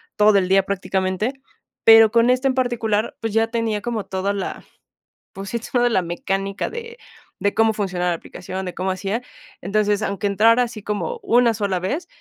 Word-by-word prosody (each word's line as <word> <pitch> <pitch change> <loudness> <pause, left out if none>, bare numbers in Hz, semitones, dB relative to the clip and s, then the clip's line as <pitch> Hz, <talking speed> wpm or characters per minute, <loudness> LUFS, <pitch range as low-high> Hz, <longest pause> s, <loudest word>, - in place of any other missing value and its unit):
todo 210 -1 +5
el 185 -1 +1
día 195 0 +4
prácticamente, 190 +4 -2 0.5
pero 225 -1 +8
con 235 +1 +4
este 255 +2 +2
en 260 - +2
particular, 235 -4 -1
pues, 225 -2 -3
ya 225 0 +2
tenía 225 -3 -2
como 230 -3 -3
toda 190 +1 -2
la 195 - -5 0.7
pues, 195 0 -7
sí, 235 - -2
toda 245 +1 +1
la 190 - +2
mecánica 195 +3 -3
de 465 0 -8 0.5
de 200 - +1
cómo 225 0 +3
funciona 180 -4 -1
la - - +1
aplicación, 185 +2 -7
de 180 - -6
cómo 190 +1 -1
hacía, 195 +6 -3 0.4
entonces, 210 +2 0
aunque 200 0 -2
entrara 225 +5 +4
así 230 -4 -4
como 330 - -3
una 240 - +3
sola 200 -4 -1
vez 275 - -3
210 Hz, 180 wpm, -21 LUFS, 195-230 Hz, 0.7 s, pero